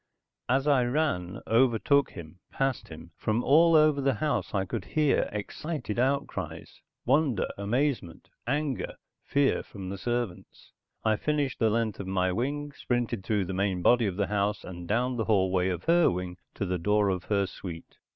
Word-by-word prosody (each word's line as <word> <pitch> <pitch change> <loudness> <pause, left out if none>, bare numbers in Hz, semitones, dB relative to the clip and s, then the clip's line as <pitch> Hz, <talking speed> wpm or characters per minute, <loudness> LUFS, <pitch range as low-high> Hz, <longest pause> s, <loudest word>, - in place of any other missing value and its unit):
As 135 +2 +2
I 140 -4 +4
ran, 120 - -1
overtook 130 +4 +3
him, 85 0 -10
passed 135 -2 -1
him, 80 +1 -11
from 110 +3 -1
all 165 +4 +5
over 155 -2 +5
the 135 -2 +2
house 150 +6 -1
I 95 -2 0
could 110 0 -4
hear 150 +5 +1
excited 120 +3 -4
outcries, 135 +3 -2 0.2
wonder, 135 -4 +2
amazement, 115 - -1 0.2
anger, 145 0 -1 0.3
fear 140 -1 +2
from 95 -3 -8
the 100 0 -5
servants. 120 -6 -4 0.3
I 110 -1 +3
finished 145 -2 -1
the 115 - +3
length 115 -1 -1
of 100 - -5
my 95 -1 +1
wing, 145 +8 -2
sprinted 120 -6 -2
through 105 -2 0
the 95 - -4
main 95 -1 -1
body 120 -2 +4
of 95 - -3
the 100 +1 +1
house, 105 0 -1
and 90 -1 -8
down 125 +5 0
the 110 - -1
hallway 95 -3 +2
of 90 -1 -3
her 170 0 +4
wing 90 0 -4 0.2
to 100 - -2
the 90 -1 -2
door 105 +3 +2
of 95 -1 -2
her 100 -2 +1
suite. 85 -3 -9
110 Hz, 170 wpm, -28 LUFS, 95-135 Hz, 0.3 s, all